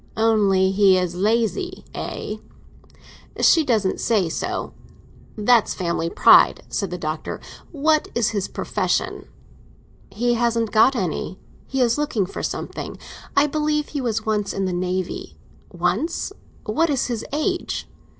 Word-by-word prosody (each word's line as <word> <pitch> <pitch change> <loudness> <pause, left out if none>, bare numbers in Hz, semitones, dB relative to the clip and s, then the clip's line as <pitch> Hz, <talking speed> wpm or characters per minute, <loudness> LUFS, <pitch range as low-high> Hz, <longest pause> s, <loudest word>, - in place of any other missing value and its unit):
"Only 200 -4 +3
he 195 -1 +5
is 180 -2 -1
lazy, 230 - 0
eh?" 210 - -5 1.0
"She 325 - +5
doesn't 220 -8 +1
say 200 -7 +1
so." - - -3 0.6
"That's 225 +1 +3
family 170 -2 -1
pride," - - +6
said 200 -3 -2
the 180 - -4
Doctor. 155 -2 -4 0.3
"What 310 0 +2
is 235 -3 +2
his 200 -3 -2
profession?" - - -2 0.8
"He 240 +5 0
hasn't 230 -2 +1
got 230 +5 +5
any; 185 -2 -2 0.3
he 265 0 -1
is 240 +2 +2
looking 250 -10 0
for 180 - -6
something. - - -5 0.4
I 280 - +6
believe 300 0 0
he 285 - -3
was 220 -3 -1
once 210 -2 0
in 195 - -1
the 185 - -1
Navy." 180 +1 -3 0.3
"Once? 180 - -1 0.3
What 320 +11 +1
is 275 -4 +1
his 235 -3 -3
age?" 350 +5 -2
220 Hz, 135 wpm, -22 LUFS, 190-265 Hz, 1.0 s, pride